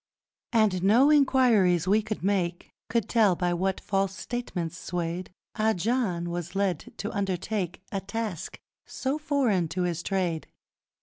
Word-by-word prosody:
And 215 -6 +3
no 235 +10 +5
enquiries 235 - +4
we 210 +3 +4
could 215 -3 -5
make 185 -3 -1 0.2
Could 230 -3 0
tell 215 -6 +4
by 175 0 0
what 190 +2 0
false 195 -1 -1
statements 180 -9 -4
swayed 175 +1 -4 0.2
Ah 220 +1 +2
John 185 -4 -1
was 175 +1 -5
led 195 -5 -1
to 215 - -4
undertake 195 -1 -2
A 195 - -2
task 200 -3 -4 0.3
so 270 +3 -2
foreign 265 - +1
to 180 +3 -2
his 170 -2 -1
trade! 175 -4 -1
195 Hz, 140 wpm, -27 LUFS, 175-220 Hz, 0.3 s, no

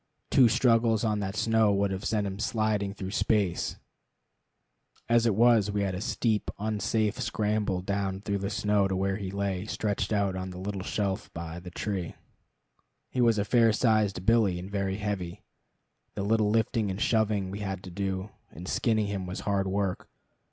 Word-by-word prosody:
Two 130 - +7
struggles 115 -1 +3
on 105 -2 +1
that 95 0 -3
snow 110 -1 +3
would 100 0 +1
have 95 +1 -4
sent 105 -2 0
him 95 0 -4
sliding 110 -3 0
through 95 -1 -6
space. 100 -4 0 1.3
As 120 0 +4
it 110 - +2
was, 115 -2 +5
we 100 0 0
had 95 -1 -1
a 90 - -4
steep, 110 -1 0
unsafe 110 0 -1
scramble 105 -3 0
down 95 0 -2
through 100 0 -2
the 100 0 -2
snow 105 -2 +2
to 95 - -1
where 95 +1 0
he 100 -3 -5
lay 100 0 -2
stretched 105 -2 -2
out 100 -3 +1
on 95 0 -4
the 90 - -8
little 95 +1 -4
shelf 100 +1 -2
by 85 0 -6
the 90 +1 -9
tree. 95 -1 -4 1.0
He 125 - 0
was 115 -2 +4
a 100 - +1
fair 115 +1 +4
sized 105 -5 +1
billy, 110 -5 +3
and 90 +3 -7
very 100 -1 -1
heavy. 100 -2 -4 0.7
The - - -2
little 110 0 +2
lifting 110 0 +1
and 95 +1 -4
shoving 105 -4 +1
we 100 - -5
had 95 -2 -4
to 90 - -9
do 95 +1 -3 0.2
in 85 - -9
skinning 110 +2 +1
him 100 -2 -3
was 90 - -5
hard 100 -1 0
work. 95 -1 -2
100 Hz, 180 wpm, -28 LUFS, 95-110 Hz, 1.3 s, Two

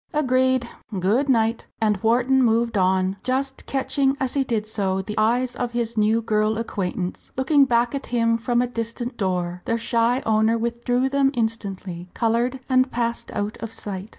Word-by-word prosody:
"Agreed! 260 -3 +2 0.3
good 225 +10 +1
night." 225 -2 +1
And 210 -3 +1
Wharton 250 +4 +3
moved 230 -1 +2
on, 185 0 +2
just 265 +1 -2
catching 275 0 +1
as 265 -2 -1
he 275 - +2
did 230 -5 -1
so 195 -3 -1
the 210 - -5
eyes 240 +3 +1
of 245 -1 -3
his 235 -1 -2
new 220 +1 +2
girl 215 0 +1
acquaintance 185 -5 -4
looking 275 +2 +4
back 240 -1 +2
at 275 -1 -4
him 230 -1 +1
from 240 +1 +1
a - - -1
distant 235 +1 -4
door. 180 -3 -2
Their 230 - 0
shy 235 +2 +1
owner 220 +1 +3
withdrew 235 +2 0
them 275 0 +3
instantly, 195 -6 -3
coloured, 240 +3 0
and 255 0 +3
passed 235 -1 -2
out 205 0 -2
of 225 -1 -6
sight. 200 -2 -6
230 Hz, 170 wpm, -23 LUFS, 215-255 Hz, 0.3 s, looking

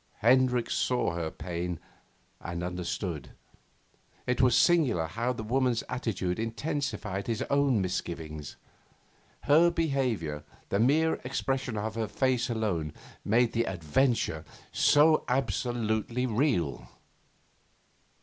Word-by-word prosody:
Hendricks 125 +1 +3
saw 125 -7 +1
her 85 -2 -2
pain 85 0 -4 0.6
and 85 +1 -5
understood. 90 -5 -4 0.9
It 125 0 +1
was 125 -2 +5
singular 135 - +3
how 115 +10 -2
the 115 -3 -5
woman's 125 0 +1
attitude 100 -7 -2
intensified 115 -4 -3
his 115 -2 -1
own 140 -6 +3
misgivings; 80 -5 -4 0.9
her 160 +4 +5
behaviour, 130 - -1 0.3
the 100 - +1
mere 155 +7 +3
expression 130 -2 -2
of 110 +1 -2
her 110 -1 -2
face 130 0 0
alone, 95 -10 -1 0.3
made 115 +2 +3
the 115 0 +1
adventure 90 - 0 0.3
so 155 +2 +5
absolutely 120 -2 -1
real. 105 - 0
115 Hz, 105 wpm, -29 LUFS, 90-130 Hz, 0.9 s, was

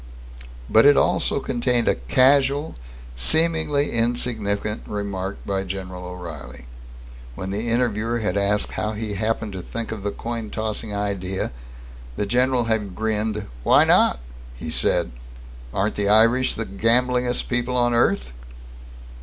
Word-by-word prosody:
But 110 - +5
it 145 - +6
also - - +2
contained 120 -1 0
a - - +5
casual, 135 - +2 0.4
seemingly 155 - +2
insignificant 115 -3 -1
remark 100 -2 -4
by 95 -1 -1
General 95 -1 -6
O'Reilly. 85 -8 -9 0.7
When 95 +7 -5
the 105 +4 -3
interviewer 115 -1 0
had 105 -5 -2
asked 100 +1 +1
how 105 +1 -2
he 105 -1 -4
happened 110 +1 -2
to 95 - -5
think 115 +5 -5
of 110 -2 -5
the 100 - -2
coin 115 +1 -5
tossing 110 0 -4
idea, 100 -2 -2 0.6
the 105 - -1
general 125 +3 +2
had 110 -5 -1
grinned. 110 -1 -1 0.2
"Why - - +5
not?" - - +4 0.4
he 80 +6 -6
said. - - +1 0.6
"Aren't 100 - 0
the 100 -1 -1
Irish 115 +4 +4
the 115 - -3
gamblingest 125 +4 +1
people 125 0 -1
on 120 -1 +2
earth?" 100 - +1
110 Hz, 135 wpm, -22 LUFS, 100-120 Hz, 0.7 s, it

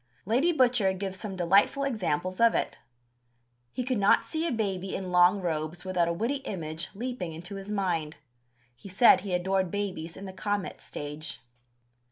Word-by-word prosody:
Lady 255 - +3
Butcher 245 - +3
gives 190 0 -5
some 195 0 -5
delightful 195 +10 +3
examples 185 - -1
of 230 0 +5
it. - - -2 0.9
He 250 - -3
could 250 -2 -1
not 200 - +4
see 320 +1 -2
a - - -1
baby 195 -5 -2
in 185 -1 -4
long 180 +3 +5
robes 160 +1 -3
without 180 -2 +1
a - - +1
witty 230 +11 -1
image 165 - -4
leaping 235 -7 -4
into 175 +5 -7
his 195 +1 -8
mind. 175 -7 -1 0.6
He 165 +11 -12
said 195 0 +6
he 190 -2 -2
adored 190 +1 0
babies 180 -5 -4
"in 195 - -8
the 190 - -7
comet 205 0 -3
stage." 150 +2 -6
190 Hz, 170 wpm, -28 LUFS, 175-215 Hz, 0.9 s, said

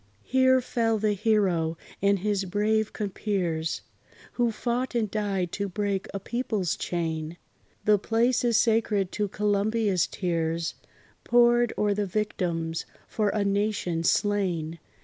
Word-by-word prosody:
Here 260 0 +4
fell 225 -2 0
the 210 0 +1
hero 190 -6 +1 0.2
and 200 +1 +3
his 200 0 -1
brave 210 +3 +1
compeers, 185 -6 -2 0.5
Who 240 -1 +1
fought 245 +3 -2
and 220 -4 0
died 195 -5 -1
to 200 -1 -3
break 200 0 -2
a 195 - -4
people's 215 -5 -2
chain: 165 -1 -3 0.5
The 210 -1 +5
place 235 +5 +1
is 235 -2 +3
sacred 220 -4 +2
to 210 -1 -1
Columbia's 205 -1 +1
tears. 165 -2 -1 0.5
Poured 240 0 +4
o'er 205 -1 +2
the 205 0 -1
victims 170 -5 -2 0.2
for 210 -2 0
a 205 0 0
nation 200 -4 0
slain. 175 -5 0
205 Hz, 130 wpm, -27 LUFS, 180-220 Hz, 0.5 s, The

